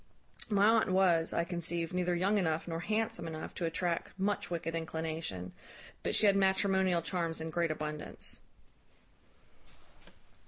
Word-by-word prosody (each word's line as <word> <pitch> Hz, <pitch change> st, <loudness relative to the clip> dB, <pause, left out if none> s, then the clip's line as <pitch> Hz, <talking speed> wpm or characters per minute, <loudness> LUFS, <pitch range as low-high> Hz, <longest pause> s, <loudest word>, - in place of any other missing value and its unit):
My 205 Hz, -1 st, +4 dB
aunt 225 Hz, -2 st, +4 dB
was, 180 Hz, -3 st, +3 dB
I 170 Hz, -, +1 dB
conceived, 170 Hz, -1 st, -3 dB
neither 180 Hz, -1 st, +1 dB
young 195 Hz, +4 st, +2 dB
enough 160 Hz, -3 st, 0 dB
nor 165 Hz, -1 st, -2 dB
handsome 220 Hz, -1 st, -1 dB
enough 160 Hz, -1 st, -6 dB
to 175 Hz, -, -3 dB
attract 170 Hz, +2 st, -2 dB
much 205 Hz, +2 st, 0 dB
wicked 165 Hz, -1 st, -3 dB
inclination; 160 Hz, -, -3 dB, 0.5 s
but -, -, -1 dB
she -, -, +4 dB
had 200 Hz, -1 st, +6 dB
matrimonial 190 Hz, -2 st, +3 dB
charms 165 Hz, -2 st, -1 dB
in 160 Hz, 0 st, -4 dB
great 170 Hz, +1 st, +1 dB
abundance. 150 Hz, -1 st, -5 dB
170 Hz, 135 wpm, -33 LUFS, 165-190 Hz, 0.5 s, had